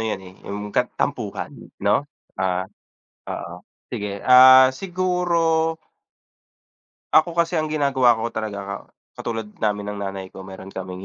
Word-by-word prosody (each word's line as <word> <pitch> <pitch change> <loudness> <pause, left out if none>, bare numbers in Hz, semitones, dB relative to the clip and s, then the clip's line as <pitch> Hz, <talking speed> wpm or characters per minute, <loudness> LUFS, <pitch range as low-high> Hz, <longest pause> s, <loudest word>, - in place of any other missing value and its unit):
'yan 110 -3 -2
eh, 90 - -12
'yong 105 +1 -5
kat - - +1
tampuhan, - - -3 0.3
'no? - - +2 0.3
Ah 95 0 0 0.6
oo, - - -5 0.4
sige, 100 -1 -4
ah, 130 +1 +9
siguro 180 +2 -1 1.8
Ako 165 +1 +4
kasi 170 -1 +2
ang 155 - -2
ginagawa 135 -6 +3
ko 115 +1 -3
talaga, 100 -3 -5 0.2
katulad 115 -1 -4 0.2
namin 105 -1 -1
ng 100 - -7
nanay 95 -1 -4
ko - - -10
meron 95 0 -10
kaming 95 0 -7
110 Hz, 130 wpm, -22 LUFS, 100-140 Hz, 1.8 s, ah